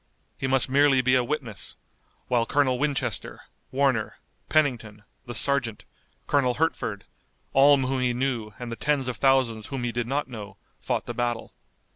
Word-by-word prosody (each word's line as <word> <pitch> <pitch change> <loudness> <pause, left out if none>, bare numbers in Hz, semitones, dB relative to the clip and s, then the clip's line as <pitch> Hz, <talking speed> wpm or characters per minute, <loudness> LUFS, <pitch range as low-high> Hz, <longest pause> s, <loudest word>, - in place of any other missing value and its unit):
He 130 - -3
must 130 -1 +3
merely 135 0 +4
be 130 0 +3
a 130 -1 +4
witness, 125 -5 -4 0.5
while 120 -2 +1
Colonel 130 -3 +2
Winchester, 135 -7 -2 0.3
Warner, 130 -5 +1 0.3
Pennington, 115 -9 0 0.2
the 120 - -5
sergeant, 125 -2 0 0.4
Colonel 130 -4 +2
Hertford, 120 -10 -1 0.5
all 140 +1 +7
whom 130 0 -1
he 125 -1 +2
knew 120 -3 -2
and 120 -1 -6
the - - -3
tens 145 0 0
of 125 -3 -3
thousands 130 -5 +2
whom 135 -3 -4
he 120 - -1
did 120 0 -2
not 140 +3 -1
know, 105 -5 -9 0.2
fought - - -2
the 120 - -5
battle. 120 -1 -2
125 Hz, 160 wpm, -26 LUFS, 115-135 Hz, 0.5 s, all